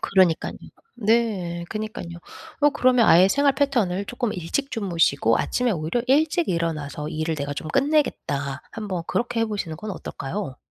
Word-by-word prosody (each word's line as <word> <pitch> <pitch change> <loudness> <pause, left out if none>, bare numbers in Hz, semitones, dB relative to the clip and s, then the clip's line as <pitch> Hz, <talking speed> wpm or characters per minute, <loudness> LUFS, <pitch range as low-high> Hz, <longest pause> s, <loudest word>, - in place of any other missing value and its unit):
그러니깐요. 185 -4 +2 0.4
네. 210 -7 0
그니깐요. 215 -6 -5 0.4
어 290 0 +5
그러면 250 -3 +3
아예 180 +3 +7
생활 280 +6 +3
패턴을 235 -10 +1
쪼끔 240 0 -3
일찍 190 - -3
주무시고 165 - +2
'아침에 250 -1 0
오히려 170 +6 -1
일찍 310 +5 +2
일어나서 155 -4 -2
일을 155 0 -2
내가 145 -1 -3
좀 155 - -5
끝내겠다.' 260 - 0
한번 200 -6 -4
그렇게 240 -1 -1
해 225 - +3
보시는 195 -7 -4
건 215 +6 -6
어떨까요? 165 -4 -5
195 Hz, 360 characters per minute, -24 LUFS, 165-240 Hz, 0.4 s, 아예